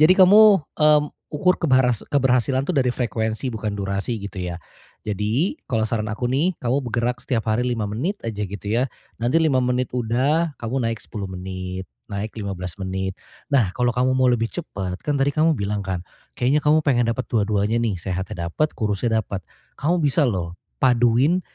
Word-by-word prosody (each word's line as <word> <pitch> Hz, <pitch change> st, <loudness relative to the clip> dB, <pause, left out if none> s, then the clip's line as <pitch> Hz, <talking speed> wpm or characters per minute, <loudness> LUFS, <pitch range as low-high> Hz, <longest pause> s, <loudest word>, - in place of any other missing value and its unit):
jadi 155 Hz, +4 st, +7 dB
kamu, 200 Hz, +1 st, +7 dB, 0.2 s
eee, 150 Hz, -1 st, +5 dB, 0.3 s
ukur 180 Hz, +5 st, +2 dB
kebaras 130 Hz, -6 st, +3 dB
keberhasilan 130 Hz, -1 st, +2 dB
itu 180 Hz, -, -1 dB
dari 130 Hz, -3 st, +2 dB
frekuensi 110 Hz, 0 st, -2 dB
bukan 105 Hz, -1 st, -2 dB
durasi 100 Hz, +4 st, -2 dB
gitu 100 Hz, -1 st, -7 dB
ya. 90 Hz, -1 st, -4 dB, 0.5 s
Jadi 110 Hz, -, 0 dB
kalau 110 Hz, -2 st, +1 dB
saran 110 Hz, -1 st, -2 dB
aku 115 Hz, +3 st, -2 dB
nih 140 Hz, +9 st, +1 dB
kamu 130 Hz, +3 st, 0 dB
bergerak 120 Hz, +2 st, -1 dB
setiap 115 Hz, -4 st, -1 dB
hari 110 Hz, +3 st, +1 dB
5 120 Hz, -4 st, -1 dB
menit 140 Hz, -, -2 dB
aja 105 Hz, -2 st, -3 dB
gitu 100 Hz, +1 st, -8 dB
ya. 120 Hz, +5 st, +1 dB, 0.3 s
Nanti 125 Hz, +7 st, +3 dB
5 145 Hz, -6 st, +2 dB
menit 125 Hz, 0 st, 0 dB
udah, 135 Hz, +8 st, +1 dB
kamu 120 Hz, +3 st, -2 dB
naik 115 Hz, -1 st, -1 dB
10 100 Hz, -2 st, -7 dB
menit, 95 Hz, 0 st, -6 dB, 0.2 s
naik 100 Hz, +2 st, -4 dB
15 95 Hz, -5 st, -5 dB
menit. 95 Hz, 0 st, -3 dB, 0.3 s
Nah, 125 Hz, -10 st, +3 dB
kalau 120 Hz, -1 st, +2 dB
kamu 125 Hz, +1 st, +2 dB
mau 130 Hz, 0 st, +3 dB
lebih 115 Hz, -2 st, +1 dB
cepet, 95 Hz, -, -5 dB
kan 145 Hz, -, +1 dB
tadi 135 Hz, +1 st, +2 dB
kamu 160 Hz, +1 st, +3 dB
bilang 100 Hz, +1 st, -2 dB
kan 90 Hz, -2 st, -2 dB, 0.3 s
kayaknya 130 Hz, +5 st, +2 dB
kamu 155 Hz, +1 st, +3 dB
pengen 120 Hz, -5 st, +3 dB
dapet 130 Hz, -, -2 dB
dua-duanya 105 Hz, 0 st, +1 dB
nih, 115 Hz, -4 st, 0 dB
sehatnya 90 Hz, 0 st, -4 dB
dapet 155 Hz, -, 0 dB
kurusnya 110 Hz, +1 st, 0 dB
dapet. 100 Hz, -, -5 dB, 0.4 s
Kamu 170 Hz, +4 st, +1 dB
bisa 145 Hz, +1 st, +3 dB
loh 90 Hz, -6 st, -2 dB, 0.3 s
paduin 125 Hz, +7 st, +4 dB
120 Hz, 175 wpm, -22 LUFS, 105-135 Hz, 0.5 s, jadi